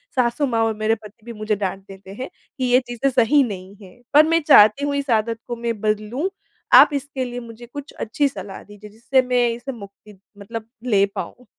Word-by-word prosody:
सासु 250 +3 +1
माँ 230 -3 0
और 220 - 0
मेरे 215 +1 +1
पति 215 0 -16
भी 235 - -7
मुझे 215 0 -2
डाँट 195 -1 -3
देते 195 0 -12
हैं 260 - -5 0.3
कि 255 - -1
ये 250 +1 +4
चीज़ें 245 +3 -1
सही 260 +3 +4
नहीं 195 -3 -7
है। 190 +5 -15
पर 300 +2 +7
मैं 330 +1 +2
चाहती 220 -1 +6
हूँ 285 0 -1
इस 280 -1 -3
आदत 225 +1 -4
को 240 - -3
मैं 230 -2 -3
बदलूँ 215 - -1 0.5
आप - - +8
इसके 275 -2 -3
लिए 245 0 -6
मुझे 235 0 -11
कुछ 285 0 -8
अच्छी 280 +6 0
सलाह 195 -6 -8
दीजिए 205 0 -13
जिससे 235 +5 +1
मैं 250 -1 +1
इसे 240 +4 -5
मुक्ति 205 -2 -13 0.2
मतलब 220 +2 -8 0.2
ले 200 0 +5
पाऊँ। 250 - -7
230 Hz, 205 wpm, -21 LUFS, 210-255 Hz, 0.5 s, आप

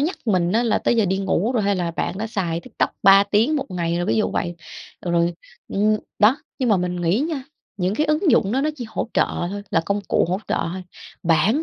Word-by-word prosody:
nhắc 320 +6 0
mình 185 -4 +2
á 230 +2 +3
là 230 - +2
tới 240 - +1
giờ 220 - +3
đi 190 +1 0
ngủ 195 +4 0
rồi 225 -4 +1
hay 200 0 +1
là 175 -2 -1
bạn 185 +3 -3
đã 220 - -2
xài 175 -6 -2
TikTok - - -2
3 195 +1 +7
tiếng 230 +11 +2
1 275 -1 -2
ngày 170 -2 -1
rồi, 175 - -1
ví - - +1
dụ 215 - +1
vậy. 175 -2 -2 0.5
Ờ, 175 - -4
rồi, 170 0 +2 0.3
ưm, 215 +2 +2 0.2
đó, 215 +6 +5 0.2
nhưng 255 -3 0
mà 210 - +4
mình 180 0 -2
nghĩ 175 +7 +1
nha, 300 -3 -2 0.3
những 185 +1 0
cái 305 +6 +1
ứng 305 +2 +2
dụng 200 +1 +3
đó 265 - +1
nó 305 - +1
chỉ 245 - -5
hỗ 220 +1 -3
trợ - - +4 0.2
thôi, 205 +1 -5
là 165 - +3
công 200 +1 0
cụ - - +3
hỗ 185 - 0
trợ - - 0 0.2
thôi, 185 - -6 0.4
bản 175 - +3
200 Hz, 255 wpm, -22 LUFS, 180-235 Hz, 0.5 s, 3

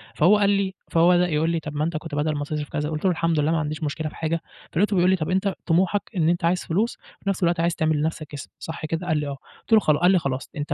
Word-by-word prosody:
فهو 190 +7 +5
قال 200 -1 +3
لي 195 -1 +1 0.2
فهو 170 +1 +5
بدأ 180 0 +4
يقول 155 +1 +1
لي: 165 -1 0
"طَب 150 -1 -7
ما 150 - 0
أنت 165 0 -1
كنت 155 -1 -6
بدل 150 +1 0
ما 145 - -2
تصرف 150 0 -4
كذا" 150 0 -2
قُلت 155 +3 -4
له: 185 - +4
"الحمد 165 -1 0
لله 150 +2 +2
ما 165 - +2
عنديش 155 +1 -3
مشكلة 155 +1 -2
في - - -15
حاجة." 165 0 -2 0.3
فلقيته 205 +4 +1
بيقول 180 0 +4
لي: - - +4
"طَب 155 -4 -3
أنت 190 +1 +1
طموحك 185 +4 +2
إن 165 -3 +2
أنت 175 -1 +1
عايز 180 +2 +1
فلوس 210 +8 0
وفي 200 - -8
نَفْس 195 -1 -1
الوقت 170 -1 +2
عايز 170 0 +1
تعمل 155 -1 +1
لنَفْسك 155 -1 -3
اسم، 145 - -7
صح 160 -1 -6
كده؟" 165 +3 -3
قال 160 -3 +2
لي: 150 -1 -2
"آه" 140 -1 -5 0.2
قُلت 225 - -3
له 220 - +8
"خل" 155 -7 +2
قال 180 +2 +5
لي: 185 - +4
"خلاص 135 -4 -3
أنت 145 0 -2
165 Hz, 295 wpm, -24 LUFS, 150-180 Hz, 0.3 s, له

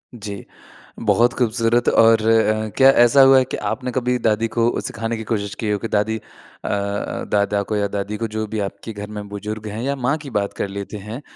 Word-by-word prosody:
जी। 100 -3 -7 0.5
बहुत 115 +3 +3
ख़ूबसूरत 120 0 +1
और 115 -1 +5
अ, 110 -1 +2
क्या 135 0 +7
ऐसा 120 +2 +5
हुआ 135 0 +7
है 130 - +4
कि - - -5
आपने 125 +3 -3
कभी 125 0 0
दादी 110 0 +1
को 120 0 +2
सिखाने 115 +1 -4
की 110 - -5
कोशिश 100 -3 -2
की 110 - -3
हो, 105 - +1
कि 115 - -4
दादी 110 +1 0
अ, - - -9 1.1
दादा 100 0 +1
को 105 - -3
या 100 -1 +1
दादी 100 +1 -4
को, 115 - -2
जो 110 0 -3
भी 110 +1 -4
आपके 100 +2 -5
घर 105 0 -7
में 105 0 -6
बुज़ुर्ग 105 +1 -6
हैं 105 +2 -5
या 140 +2 -1
माँ 135 +3 0
की 140 - -7
बात 100 0 -3
कर - - -3
लेते 100 +2 -6
हैं, 105 +6 -7
110 Hz, 215 wpm, -21 LUFS, 105-120 Hz, 1.1 s, क्या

